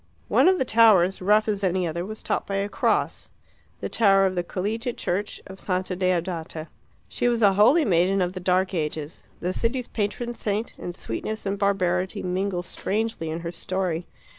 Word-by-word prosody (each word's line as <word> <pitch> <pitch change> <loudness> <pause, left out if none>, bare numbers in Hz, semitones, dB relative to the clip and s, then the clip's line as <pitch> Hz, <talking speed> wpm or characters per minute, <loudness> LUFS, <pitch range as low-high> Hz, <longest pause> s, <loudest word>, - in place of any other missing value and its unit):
One - - +5
of 375 0 +5
the 260 - 0
towers, 210 -6 +5
rough 210 +3 +3
as 205 -2 -1
any 185 -1 +1
other, 170 +1 -3
was 215 +3 -7
topped - - -1
by 195 - -2
a 200 +1 0
cross - - 0 0.5
the - - -2
tower 195 -3 +4
of 190 - +1
the 180 - 0
Collegiate 220 +7 -3
Church 200 +4 -2
of 190 0 -11
Santa 185 -1 -2
Deodata. 175 -3 -2 0.4
She - - -1
was 235 -2 +1
a 200 -1 +6
holy 245 - +5
maiden 185 +1 +3
of 180 -1 0
the 185 - -5
Dark 185 +1 +1
Ages, 155 -2 -3 0.2
the 180 +1 -1
city's 240 +3 -1
patron 235 +3 -2
saint, 215 0 -2
and 175 - -6
sweetness 215 - -5
and 200 0 -2
barbarity 190 0 0
mingle 185 0 -1
strangely 210 -2 -2
in 160 +2 -4
her 170 0 -4
story. 180 -1 -2
190 Hz, 185 wpm, -25 LUFS, 180-210 Hz, 0.5 s, a